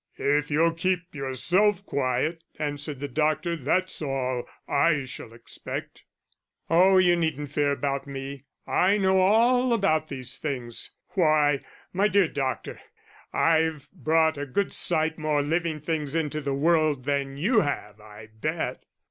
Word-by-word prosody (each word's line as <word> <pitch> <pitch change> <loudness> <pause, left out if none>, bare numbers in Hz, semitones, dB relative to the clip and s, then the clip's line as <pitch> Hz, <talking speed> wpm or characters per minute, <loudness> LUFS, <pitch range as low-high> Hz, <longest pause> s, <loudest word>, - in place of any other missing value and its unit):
"If 145 +1 +1
you'll 165 +3 +3
keep 180 +1 -1
yourself 175 +9 +1
quiet," 140 +5 -1
answered 145 -1 -4
the 145 - -3
doctor, 155 +5 0
"that's 180 +6 -1
all 130 -4 -2 0.2
I 145 -1 +2
shall 125 -3 -9
expect." 115 0 -8 0.7
"Oh, 185 +3 +6
you 180 -2 +5
needn't 155 -4 -2
fear 145 -1 +1
about 140 0 -2
me. 135 0 -7 0.2
I 195 +3 +3
know 190 -1 +3
all 235 +6 +4
about 160 -8 +1
these 130 -3 -7
things 125 -6 -4
why, 155 -5 +2 0.3
my 195 +3 +3
dear 200 -3 +3
doctor, 135 -4 -3 0.5
I've 160 -3 +1
brought 160 -1 +1
a 145 - -4
good 195 +10 -1
sight 160 -1 +2
more 150 -2 +1
living 160 +1 -1
things 150 -1 -3
into 155 -2 -1
the 140 -1 -2
world 155 -3 +2
than 140 -1 -1
you 215 - +3
have, 110 - -3
I 105 +1 -13
bet." 155 +9 -3
155 Hz, 140 wpm, -26 LUFS, 140-170 Hz, 0.7 s, Oh